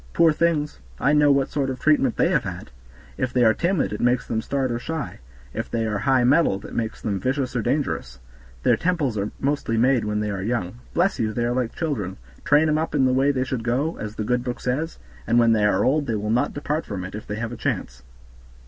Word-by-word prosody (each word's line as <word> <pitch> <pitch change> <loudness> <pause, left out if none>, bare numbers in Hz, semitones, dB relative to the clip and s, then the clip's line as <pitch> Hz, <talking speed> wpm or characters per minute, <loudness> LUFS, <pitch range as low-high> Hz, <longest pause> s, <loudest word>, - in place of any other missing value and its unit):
Poor 165 -2 +5
things! 155 -2 0 0.2
I 145 - +3
know 150 -1 +5
what 140 -1 +2
sort 140 -2 0
of 130 -1 -4
treatment 150 -5 +2
they - - +3
have - - +2
had. - - -7 0.5
If 125 - 0
they 125 -1 +3
are 110 -1 +6
timid 170 - 0
it 105 - -4
makes 125 0 +2
them 110 -1 -1
start 135 +1 -1
or 120 - -2
shy; 160 +3 -5 0.3
if 115 +2 -4
they 115 -1 -1
are 105 -2 -1
high 130 -2 +3
mettled 125 -7 +3
it - - -9
makes 115 -1 -3
them 100 -3 -1
vicious 130 +4 -1
or 120 - +1
dangerous; 110 - -2 0.5
their - - +4
tempers 165 -9 0
are 100 0 -1
mostly 135 -5 0
made 125 0 +3
when 105 0 -1
they 105 0 -1
are 95 -1 -3
young. 115 0 -2 0.2
Bless 185 +3 +2
you! 110 -1 0
they 120 +2 0
are 120 - 0
like 125 -2 -2
children, 115 - -3 0.3
train 150 +2 +4
'em 155 0 +2
up 160 -1 -2
in 135 -2 +4
the 130 - +3
way 135 +2 +3
they 130 -2 +1
should 130 -3 -3
go, 130 +8 0
as 105 0 -5
the 110 - -3
good 125 +2 0
book 125 -1 -4
says, 145 +7 -2 0.3
and 115 - +3
when 115 -1 +5
they 105 -2 +2
are 105 -2 +2
old 145 +2 +2
they 115 - 0
will 105 +1 -2
not 120 +2 +1
depart 150 +2 -2
from 95 -3 -5
it, 90 - -7
if 105 - -7
they 105 - -3
have 115 +1 -4
a - - -5
chance." 65 - -3
125 Hz, 245 wpm, -23 LUFS, 110-145 Hz, 0.5 s, are